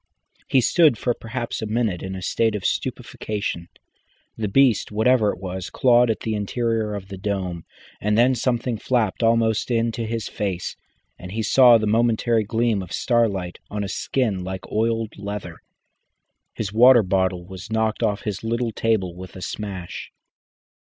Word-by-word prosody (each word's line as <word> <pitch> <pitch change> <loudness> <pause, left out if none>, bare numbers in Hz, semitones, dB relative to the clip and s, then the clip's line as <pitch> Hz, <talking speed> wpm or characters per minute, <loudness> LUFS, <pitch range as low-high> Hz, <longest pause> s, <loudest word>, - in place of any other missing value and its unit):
He 130 - +4
stood 155 -1 +4
for 120 - 0
perhaps 120 +1 -5
a 110 - -3
minute 110 -5 -1
in 95 0 -5
a 95 - -7
state 110 +4 +1
of 100 - -5
stupefaction. 100 -5 -3 0.7
The 110 - -2
beast, 120 +1 +3
whatever 110 0 +3
it - - -8
was, 95 -1 -5
clawed 120 -1 +4
at 110 - -1
the 110 - -2
interior 110 0 -1
of 100 -1 -7
the 95 -2 -8
dome, 95 -4 -3 0.4
and 105 +1 +1
then 125 +3 +5
something 120 -2 -1
flapped 120 -5 0
almost 115 -1 +2
into 115 -1 0
his 115 -2 -3
face, 95 -4 -3 0.4
and 90 +1 -8
he 110 0 -2
saw 120 +1 +7
the 110 - -1
momentary 115 +1 +2
gleam 110 -1 0
of 90 - -9
starlight 100 -7 0
on 105 0 -3
a - - -3
skin 105 -2 -1
like 95 0 -6
oiled 115 -1 -1
leather. 100 -4 -6 1.0
His 105 -2 -4
water 120 +1 +7
bottle 95 -1 0
was 95 +1 -9
knocked 110 -1 0
off 105 0 0
his 105 -2 -4
little 115 +1 -1
table 105 -5 0
with 90 -2 -10
a 95 - -8
smash. 95 -5 -6
110 Hz, 165 wpm, -23 LUFS, 95-115 Hz, 1.0 s, saw